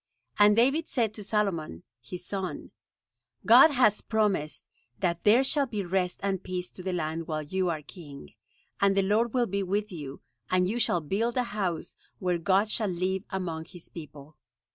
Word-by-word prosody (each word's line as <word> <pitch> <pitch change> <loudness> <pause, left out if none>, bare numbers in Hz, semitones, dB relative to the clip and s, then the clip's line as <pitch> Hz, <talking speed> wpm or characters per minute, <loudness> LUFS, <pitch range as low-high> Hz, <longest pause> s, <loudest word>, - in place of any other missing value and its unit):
And 205 0 +7
David 275 +8 +3
said 225 -5 0
to 215 - -7
Solomon, 190 - -2 0.2
his 175 +9 -8
son: 190 -2 -5 0.7
"God 245 +8 +8
has 245 -7 +3
promised 205 -9 -1 0.3
that 170 -3 -1
there 230 +5 +5
shall 280 +1 +1
be 210 -5 -3
rest 180 0 -1
and 195 -2 -1
peace 180 -1 -5
to - - -11
the 185 +1 -3
land 165 -1 -3
while 155 -1 -2
you 185 +4 -1
are 155 -3 -3
king; 145 - -12 0.5
and 200 0 +3
the 195 - +4
Lord 215 +5 +1
will 245 -1 +3
be 200 -1 -2
with 205 +3 -1
you, 145 -6 -8 0.3
and 180 0 +2
you 225 +5 -2
shall 175 -7 +2
build 220 - -1
a 250 - +3
house, 195 -8 -3 0.2
where 180 -2 -1
God 195 +5 +2
shall 215 -1 0
live 185 +2 -1
among 170 -4 -4
His 175 -2 -14
people." 150 -2 -11
190 Hz, 180 wpm, -28 LUFS, 170-210 Hz, 0.7 s, God